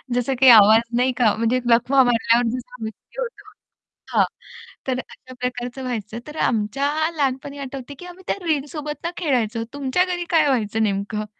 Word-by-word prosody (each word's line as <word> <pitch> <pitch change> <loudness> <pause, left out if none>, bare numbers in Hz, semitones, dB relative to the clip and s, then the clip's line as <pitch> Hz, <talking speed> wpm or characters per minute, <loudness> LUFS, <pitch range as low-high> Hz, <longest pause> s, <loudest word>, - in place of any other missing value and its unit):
जसं 245 +2 0
काही 260 -2 +8
आवाज 220 +1 +8 0.2
नाही 255 +1 +2
का 225 -4 +4
म्हणजे 230 +3 +1
लखवा 250 +3 +4
मारल्यावर 235 0 +2
जसा 250 0 -10
व्यक्ति 220 - -9
होतो 475 -3 -6 0.7
हां. - - +6 0.6
तर 255 -1 0
अशा 255 0 -11
प्रकारचं 250 +1 -4
व्हायचं 230 -2 -4
तर 300 +1 -9
आमच्या 240 +5 0 0.3
लहानपणी 280 0 -2
आठवतंय 275 0 -7
की 360 - -9
आम्ही 360 +1 -12
त्या - - 0
रिंगसोबत 295 0 -2
ना 340 - -1
खेळायचो. 235 -8 0
तुमच्या 285 +6 +1
घरी 355 -1 -3
काय 315 -3 +4
व्हायचं 225 -4 0
नेमकं? 205 +1 -2
255 Hz, 165 wpm, -22 LUFS, 230-285 Hz, 0.7 s, काही